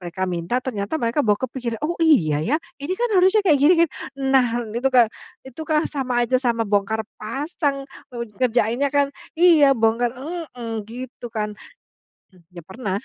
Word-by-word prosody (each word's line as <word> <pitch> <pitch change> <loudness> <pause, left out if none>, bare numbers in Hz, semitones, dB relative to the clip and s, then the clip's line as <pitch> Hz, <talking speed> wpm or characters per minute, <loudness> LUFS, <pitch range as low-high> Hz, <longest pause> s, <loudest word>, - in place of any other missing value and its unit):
mereka 180 +1 -4
minta 175 +4 -2
ternyata 210 +1 -3
mereka 235 -1 0
bawa 210 -6 +2
kepikiran, 245 -3 -4
"Oh 325 - 0
iya 170 - +3
ya, 250 - +1 0.2
ini 290 +6 -3
kan 485 +3 0
harusnya 390 +3 +4
kayak 305 -7 +4
gini 300 +6 +6
kan." - - -5 0.4
Nah 260 -2 +5 0.3
itu 240 +4 0
ka 245 -4 +4 0.3
itu 265 +3 -11
kah 310 0 +2
sama 255 -4 -1
aja 255 +2 +1
sama 235 -3 0
bongkar 210 +1 0 0.2
pasang, 275 +4 -2 0.2
nger 235 -4 -7 0.2
ngerjainnya 240 +4 +1
kan 280 0 +2 0.2
iya, 315 -6 +6
bongkar 230 +2 +2
heeh, 265 -5 -6 0.2
gitu 245 0 -8
kan. 215 -2 -3 0.8
M 180 - -21
ya, 175 -1 -11
pernah, 195 -1 -3
245 Hz, 165 wpm, -22 LUFS, 220-285 Hz, 0.8 s, gini